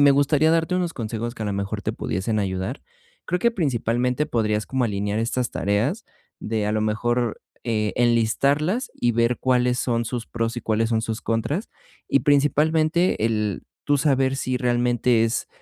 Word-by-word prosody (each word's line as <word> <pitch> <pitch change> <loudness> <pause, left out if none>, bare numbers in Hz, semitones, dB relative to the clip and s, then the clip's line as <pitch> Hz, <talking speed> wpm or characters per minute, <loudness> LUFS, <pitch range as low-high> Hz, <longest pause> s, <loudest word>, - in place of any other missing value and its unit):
me 145 0 +7
gustaría 145 +3 +3
darte 165 +2 +1
unos 175 -2 0
consejos 115 0 -4
que 110 - -5
a - - -2
lo 100 - -1
mejor 100 0 -3
te - - -2
pudiesen 95 +6 -2
ayudar. 95 +6 -3 0.4
Creo 180 - 0
que 235 +6 +3
principalmente 125 - 0
podrías 105 -2 0
como 130 -1 -1
alinear 105 -1 -1
estas 120 +1 -1
tareas 110 - 0 0.4
de, 110 -1 -2
a 105 - 0
lo 110 - 0
mejor, 120 +2 0 0.2
eh, 105 -4 0
enlistarlas, 140 - +2
y 120 - +1
ver 115 +1 +1
cuáles 125 -1 +2
son 120 -2 0
sus 115 0 -4
pros 115 0 -2
y - - -2
cuáles 110 +1 0
son 110 -1 +1
sus 110 -1 -3
contras, 125 - -2 0.4
y 140 - +3
principalmente 155 +1 +2
el 105 -4 -1 0.2
tú 145 - +3
saber 135 -2 +2
si 130 -1 -1
realmente 120 -1 +2
es, 115 +1 -2
120 Hz, 175 wpm, -23 LUFS, 110-140 Hz, 0.4 s, me